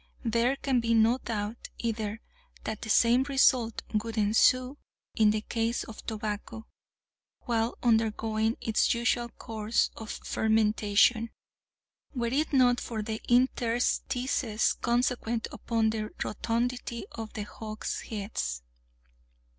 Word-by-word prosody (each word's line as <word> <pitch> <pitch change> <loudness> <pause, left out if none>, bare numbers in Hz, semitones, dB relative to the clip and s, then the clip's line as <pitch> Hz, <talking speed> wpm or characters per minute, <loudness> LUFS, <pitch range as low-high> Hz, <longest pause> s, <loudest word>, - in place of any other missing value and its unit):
There 235 +3 +2
can 270 -2 +1
be 230 0 +1
no 225 +3 +4
doubt 220 -1 -4
either 220 -2 -3 0.4
that 220 -1 -4
the 220 - -6
same 235 +3 +5
result 260 -4 +2
would 220 +1 -2
ensue 250 +6 +3 0.3
in 215 -1 +4
the 215 0 +1
case 230 +2 -1
of 220 - -10
tobacco, 215 0 -4 0.8
while 230 -1 -1
undergoing 220 -1 +1
its 225 +1 +2
usual 240 0 0
course 220 -1 -1
of 220 -1 -8
fermentation, 220 +1 +2 0.9
were 235 -1 -1
it 300 +3 +1
not 250 -3 +4
for 220 -3 -4
the 220 0 -4
interstices 245 -1 +1
consequent 240 -1 0
upon 225 -2 0
the 215 -1 -3
rotundity 235 +1 -2
of 225 -1 -7
the 210 - -4
hogsheads. 210 - -5
225 Hz, 115 wpm, -29 LUFS, 220-240 Hz, 0.9 s, same